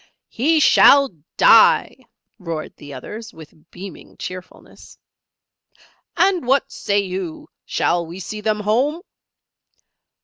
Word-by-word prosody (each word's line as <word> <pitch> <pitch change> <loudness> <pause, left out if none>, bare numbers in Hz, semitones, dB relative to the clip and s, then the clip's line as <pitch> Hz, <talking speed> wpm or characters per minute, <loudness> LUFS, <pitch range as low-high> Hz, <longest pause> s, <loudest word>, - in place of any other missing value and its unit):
"He 310 +7 +1
shall 280 -2 +5 0.3
die!" - - +5 0.4
roared 165 -4 -6
the 145 - -12
others, 215 - -9
with 155 -1 -16
beaming 190 +1 -12
cheerfulness. 185 0 -11 1.2
"And 355 -5 +1
what 270 +1 +1
say 200 - -2
you 185 -4 -6 0.2
shall 170 -1 -1
we 170 +3 -9
see 210 +3 -7
them 210 0 -1
home?" 265 - 0
210 Hz, 105 wpm, -20 LUFS, 175-270 Hz, 1.2 s, shall